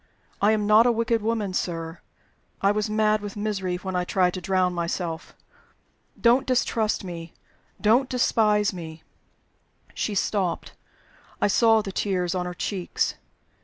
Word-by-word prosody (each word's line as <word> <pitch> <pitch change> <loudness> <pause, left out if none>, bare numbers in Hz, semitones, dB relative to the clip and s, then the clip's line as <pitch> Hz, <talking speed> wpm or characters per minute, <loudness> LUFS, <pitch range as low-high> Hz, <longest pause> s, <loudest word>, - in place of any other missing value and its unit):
I 205 - +5
am 210 -1 0
not 215 +3 +6
a - - +5
wicked 230 0 0
woman, 215 -3 -1
sir 165 -2 -3 0.6
I 195 - +3
was 210 +1 -1
mad 215 0 +2
with 205 0 -7
misery 195 -4 -2
when 185 +1 -5
I 180 - +1
tried 180 -1 +1
to 185 - -5
drown 185 0 +1
myself. 170 -1 -4 0.8
Don't 245 +3 +4
distrust 230 -5 +1
me! 170 -2 -7 0.5
Don't 240 +5 +3
despise 210 -5 +2
me!" 160 -3 -8 0.9
She 210 - -2
stopped; 190 -3 -1 0.7
I - - +3
saw 225 +1 +4
the 195 - -5
tears 185 -3 -1
on 180 -1 -2
her 180 - -6
cheeks. 185 0 -2
200 Hz, 145 wpm, -25 LUFS, 180-220 Hz, 0.9 s, not